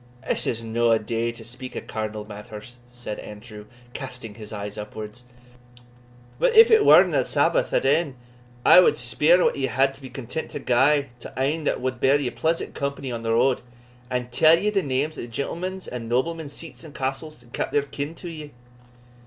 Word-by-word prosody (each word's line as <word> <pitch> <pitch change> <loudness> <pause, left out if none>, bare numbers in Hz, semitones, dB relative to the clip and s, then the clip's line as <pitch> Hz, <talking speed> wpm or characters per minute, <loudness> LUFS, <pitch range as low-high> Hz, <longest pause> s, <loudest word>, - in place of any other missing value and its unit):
"This - - 0
is 115 -1 -2
no 115 +1 +1
a 115 - +5
day 115 +2 -2
to 115 -1 -11
speak 125 +3 -8
o' - - -2
carnal 110 -1 -5
matters," 105 +3 -10
said 120 -3 -7
Andrew, 105 0 -10 0.3
casting 125 -5 -7
his 105 0 -11
eyes 105 -1 -6
upwards; 105 +2 -8 1.2
"but - - +2
if 450 +1 +8
it 445 -1 +6
werena - - +6
Sabbath - - +1
at - - +1
e'en, 155 -5 +2 0.5
I - - +9
wad 180 - +4
speer 150 +10 +4
what - - +2
ye 135 -1 0
wad 135 +1 +2
be 130 - -9
content 135 +5 -6
to - - -6
gie 140 +3 +2
to - - -9
ane 150 +4 0
that - - 0
wad 130 -1 -2
bear 140 +3 +4
ye 130 -4 -2
pleasant 165 +1 -1
company 140 -2 -4
on 115 -1 -4
the 115 0 0
road, 130 +2 +2 0.5
and 125 -1 -3
tell 155 +6 +6
ye 210 +4 0
the 200 -2 +1
names 145 +2 -2
of - - -4
the - - -11
gentlemen's 175 +10 -4
and 115 -2 -6
noblemen's 145 +4 -1
seats 165 0 -9
and 155 -3 -12
castles, 140 +3 -4
and 120 - -22
count - - -2
their 145 - +2
kin 145 +3 -5
to 175 - -9
ye?" 155 -3 -8
130 Hz, 195 wpm, -24 LUFS, 115-155 Hz, 1.2 s, I